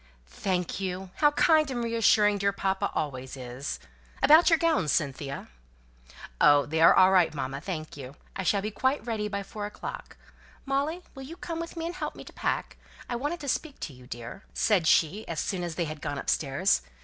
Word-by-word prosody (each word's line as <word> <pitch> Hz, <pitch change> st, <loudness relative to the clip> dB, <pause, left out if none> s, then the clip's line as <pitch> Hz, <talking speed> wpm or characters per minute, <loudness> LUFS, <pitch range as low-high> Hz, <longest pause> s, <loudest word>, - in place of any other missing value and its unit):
"Thank 180 Hz, -, -2 dB
you. 185 Hz, -1 st, -4 dB
How 295 Hz, -, +5 dB
kind 310 Hz, 0 st, +4 dB
and 245 Hz, -2 st, -2 dB
reassuring 215 Hz, -3 st, +3 dB
dear 200 Hz, 0 st, +2 dB
papa 195 Hz, -1 st, -1 dB
always 130 Hz, -2 st, -3 dB
is! 125 Hz, +2 st, -5 dB, 0.4 s
About 315 Hz, +5 st, +7 dB
your 330 Hz, -, +5 dB
gowns, 320 Hz, -, +2 dB
Cynthia?" 140 Hz, -1 st, -2 dB, 0.9 s
"Oh, 145 Hz, -1 st, +6 dB
they're 160 Hz, +2 st, +5 dB
all 185 Hz, 0 st, +6 dB
right, 180 Hz, -3 st, +4 dB
mamma, 135 Hz, 0 st, -4 dB
thank 155 Hz, -4 st, -5 dB
you. 135 Hz, -1 st, -9 dB, 0.2 s
I -, -, -2 dB
shall 195 Hz, +1 st, +1 dB
be 215 Hz, -, -2 dB
quite 260 Hz, +4 st, 0 dB
ready 220 Hz, -3 st, -2 dB
by 200 Hz, -1 st, -3 dB
four 205 Hz, +1 st, -6 dB
o'clock. 210 Hz, -, -8 dB, 0.5 s
Molly, 285 Hz, +6 st, -1 dB
will 270 Hz, -, -9 dB
you 305 Hz, +6 st, -9 dB
come 330 Hz, -2 st, -5 dB
with 335 Hz, +1 st, -6 dB
me 330 Hz, -, -3 dB
and 340 Hz, -, -3 dB
help 370 Hz, -, -4 dB
me -, -, -9 dB
to -, -, -13 dB
pack? -, -, -2 dB, 0.3 s
I 245 Hz, -, -3 dB
wanted 295 Hz, +7 st, -3 dB
to 285 Hz, -, -6 dB
speak 290 Hz, +2 st, -2 dB
to 145 Hz, -, -5 dB
you, 125 Hz, -1 st, -15 dB
dear," 120 Hz, +9 st, -8 dB
said 195 Hz, -7 st, +2 dB
she, 170 Hz, +8 st, +3 dB
as 165 Hz, -, -3 dB
soon 185 Hz, -3 st, -2 dB
as 170 Hz, -2 st, -4 dB
they 170 Hz, -, -1 dB
had 155 Hz, -1 st, -7 dB
gone 145 Hz, -, -3 dB
upstairs. 140 Hz, +6 st, +1 dB
195 Hz, 195 wpm, -28 LUFS, -, 0.9 s, About